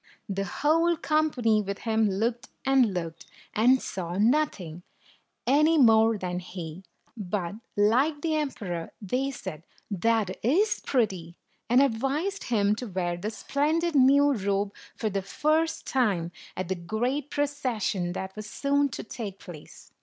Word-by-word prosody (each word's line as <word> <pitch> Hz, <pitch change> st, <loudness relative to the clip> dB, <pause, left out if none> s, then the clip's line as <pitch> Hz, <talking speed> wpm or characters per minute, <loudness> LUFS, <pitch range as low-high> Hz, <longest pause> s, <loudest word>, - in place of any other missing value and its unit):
The 195 Hz, -1 st, -2 dB
whole 330 Hz, -, +2 dB
company 295 Hz, -9 st, +2 dB
with 200 Hz, -1 st, -5 dB
him 220 Hz, -2 st, +2 dB
looked 230 Hz, +6 st, -1 dB, 0.2 s
and 265 Hz, -5 st, +4 dB
looked, 165 Hz, -3 st, -5 dB, 0.3 s
and 250 Hz, +5 st, +4 dB
saw 175 Hz, -5 st, -5 dB
nothing, 210 Hz, -, +1 dB, 0.6 s
any 305 Hz, +5 st, +4 dB
more 225 Hz, -4 st, +5 dB
than 180 Hz, -2 st, -3 dB
he; 175 Hz, -2 st, -7 dB, 0.3 s
but, 195 Hz, -4 st, -3 dB, 0.2 s
like 260 Hz, +9 st, +3 dB
the 320 Hz, -2 st, +1 dB
emperor, 215 Hz, -, -3 dB
they 250 Hz, +7 st, -1 dB
said, 190 Hz, -, -7 dB, 0.3 s
"That 215 Hz, 0 st, +1 dB
is 380 Hz, -, +2 dB
123 -, -, -7 dB
pretty! 190 Hz, -10 st, 0 dB, 0.2 s
" -, -, -43 dB
and 250 Hz, +3 st, +6 dB
advised 280 Hz, -, -1 dB
him 205 Hz, -4 st, +2 dB
to 250 Hz, -, -5 dB
wear 180 Hz, -3 st, -2 dB
the 175 Hz, +5 st, -4 dB
splendid 310 Hz, +8 st, 0 dB
new 280 Hz, +1 st, +5 dB
robe 200 Hz, -2 st, -1 dB, 0.2 s
for 215 Hz, -2 st, -2 dB
the 195 Hz, 0 st, -1 dB
first 310 Hz, +11 st, 0 dB
time 200 Hz, -10 st, +1 dB, 0.3 s
at 185 Hz, -, -2 dB
the 190 Hz, -, 0 dB
great 245 Hz, +11 st, -2 dB
proces 285 Hz, -7 st, -2 dB
sion 175 Hz, -3 st, -1 dB
that 190 Hz, +1 st, -5 dB
was 215 Hz, 0 st, -7 dB
soon 285 Hz, +2 st, +1 dB
to 230 Hz, -, -6 dB
take 215 Hz, -4 st, -6 dB
place. 170 Hz, -6 st, -12 dB
225 Hz, 150 wpm, -27 LUFS, 190-280 Hz, 0.6 s, and